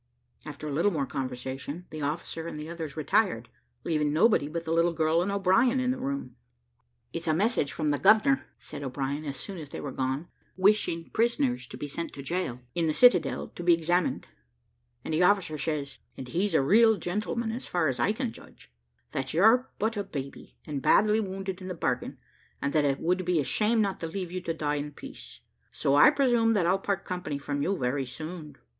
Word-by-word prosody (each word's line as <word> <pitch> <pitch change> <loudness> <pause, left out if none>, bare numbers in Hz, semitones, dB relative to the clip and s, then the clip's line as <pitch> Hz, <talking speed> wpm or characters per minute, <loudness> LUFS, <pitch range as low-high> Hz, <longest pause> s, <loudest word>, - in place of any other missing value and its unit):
After 150 0 -7
a - - -3
little 165 +8 +2
more 150 -8 -1
conversation, 135 +5 -5
the 155 - -6
officer 160 +2 -3
and 160 - -6
the 150 +1 -6
others 160 -3 -6
retired, 155 - +1 0.3
leaving 150 -3 0
nobody 165 -1 +3
but 170 +2 -4
the 160 - -3
little 170 +1 +3
girl 160 +1 +2
and 190 +3 -1
O'Brien 200 +7 +3
in 255 0 +1
the 255 - -3
room. 270 - -4 0.8
"It's 165 0 -5
a 155 - +3
message 195 - +1
from 150 -1 -1
the 145 - 0
governor," 220 - +4
said 145 - -8
O'Brien, 140 +2 -3
as 140 -2 -4
soon 195 -3 -6
as 150 -3 -8
they - - -7
were 140 - -5
gone, 130 +5 -2 0.3
"wishing 190 -4 +3
the - - -23
prisoners 140 - +1
to - - -9
be 145 - -5
sent 165 +4 -5
to 140 - -8
the - - -10
gaol 170 -9 -2
in 170 -1 0
the 155 - 0
citadel, 245 0 +4
to - - -9
be 170 -1 +6
examined; 175 +2 0 0.8
and - - -3
the 155 - +2
officer 180 -4 +3
says 145 -2 -3 0.2
(and 130 -1 -7
he's 195 +8 0
a - - +4
real 220 +8 +5
gentleman, 215 +5 -2
as 240 +3 -5
far 175 -3 +1
as 130 -3 -2
I 200 - +3
can 240 +2 -2
judge) - - -16 0.4
that 135 +2 -3
you're 225 +8 +5
but 220 +1 -1
a 205 - -1
baby, 140 -6 -8
and 145 -3 -4
badly 215 +7 +4
wounded 190 -2 -4
in 185 - -7
the 185 - -4
bargain, - - -2 0.4
and 140 - -2
that 150 -2 +3
it 135 -1 +1
would 180 +2 0
be 180 -2 +1
a - - +1
shame 220 - +2
not 195 -2 -1
to 165 - -3
leave 180 +1 -5
you 185 0 -4
to 165 - -2
die 150 -2 -1
in 145 +1 -5
peace; - - -10 0.3
so 135 - 0
I 145 - +8
presume 240 -6 +3
that 195 -5 +2
I'll 185 +3 +2
part 195 0 -2
company 180 -6 -3
from 145 0 -3
you 190 +6 0
very 130 0 -1
soon." 155 +1 -7
165 Hz, 215 wpm, -28 LUFS, 145-200 Hz, 0.8 s, I